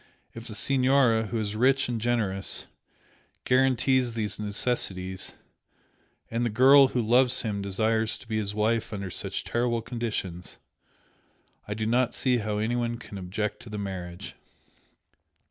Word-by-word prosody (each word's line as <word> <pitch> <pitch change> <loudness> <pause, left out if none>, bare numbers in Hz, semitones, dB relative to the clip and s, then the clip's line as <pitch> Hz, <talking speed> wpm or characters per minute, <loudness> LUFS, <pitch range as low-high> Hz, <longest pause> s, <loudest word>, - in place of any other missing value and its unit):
If 115 +1 -9
the 110 - -6
Signora, 130 -2 +3
who 115 - -3
is 105 -1 -2
rich 135 +4 +3
and 120 -2 -3
generous, 105 -5 -1 0.8
guarantees 130 -1 +2
these 105 -2 -2
necessities, 95 -3 -2 1.0
and 115 +1 0
the 120 - +1
girl 135 +5 +7
who 125 -1 -1
loves 125 +3 +3
him 105 -3 -2
desires 110 +3 0
to - - -15
be 110 -1 -1
his 105 -1 -3
wife 110 +1 0
under 100 -2 -4
such - - -3
terrible 120 -1 -1
conditions, 110 -8 -4 1.1
I 105 - -3
do 110 0 -2
not 125 +2 +1
see 125 -2 +2
how 105 -2 -2
anyone 120 +2 -1
can 105 -4 -9
object 95 +3 -3
to 115 - -11
the 105 - -5
marriage." 90 -3 -6
115 Hz, 145 wpm, -27 LUFS, 105-120 Hz, 1.1 s, girl